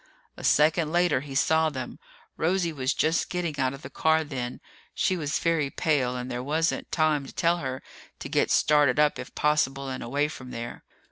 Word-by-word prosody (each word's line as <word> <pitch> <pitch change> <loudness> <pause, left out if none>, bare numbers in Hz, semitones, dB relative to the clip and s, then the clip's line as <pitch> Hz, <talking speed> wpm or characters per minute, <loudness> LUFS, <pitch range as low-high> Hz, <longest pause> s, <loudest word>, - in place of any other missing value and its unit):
A - - -11
second 155 +1 +3
later, 175 -4 +3
he 140 -1 -8
saw 160 +3 +3
them. 130 -4 -6 0.4
Rosie 175 0 0
was 130 -2 -1
just 160 +2 +1
getting 170 -5 -3
out 130 0 0
of 135 - -14
the 130 - -7
car 160 +2 +2
then. 125 -5 -5 0.4
She 185 - +1
was 155 -3 -1
very 165 -4 +1
pale 135 -5 0
and 125 +1 -5
there 125 0 -3
wasn't 155 +5 -1
time 155 -4 +1
to - - -9
tell 170 0 +1
her 130 -5 -5 0.3
to - - -7
get - - +1
started 145 -3 +3
up 150 -1 +3
if - - -8
possible 140 -3 +1
and 130 - -5
away 140 +5 0
from 130 -4 -9
there. 120 -1 -7
150 Hz, 195 wpm, -26 LUFS, 130-160 Hz, 0.4 s, second